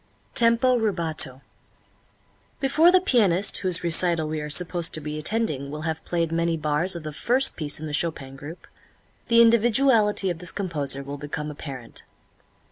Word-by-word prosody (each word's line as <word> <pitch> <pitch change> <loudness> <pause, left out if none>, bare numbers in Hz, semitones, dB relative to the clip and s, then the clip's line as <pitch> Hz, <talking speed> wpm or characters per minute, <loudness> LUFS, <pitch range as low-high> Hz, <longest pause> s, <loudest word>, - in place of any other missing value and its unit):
Tempo 240 +2 +3
Rubato. 160 - -1 1.2
Before 310 +6 +4
the 370 - +5
pianist 205 - +2
whose 185 -2 0
recital 170 -1 +3
we 155 0 -4
are 150 - -6
supposed 175 +1 +1
to - - -3
be 150 0 -6
attending 155 -7 -2
will 150 +2 -7
have 160 0 -4
played 170 -2 -2
many 165 0 -1
bars 155 +4 +1
of 170 - -7
the 155 -1 -7
first 255 - +1
piece 150 -2 -1
in 155 - -7
the 150 - -6
Chopin 145 -4 -3
group, 145 +5 -11 0.6
the 230 0 +5
individuality 230 -3 +2
of 165 - -7
this 175 -1 -3
composer 150 -8 -1
will 140 +1 -8
become 150 +1 -6
apparent. 135 -5 -6
170 Hz, 160 wpm, -24 LUFS, 150-210 Hz, 1.2 s, the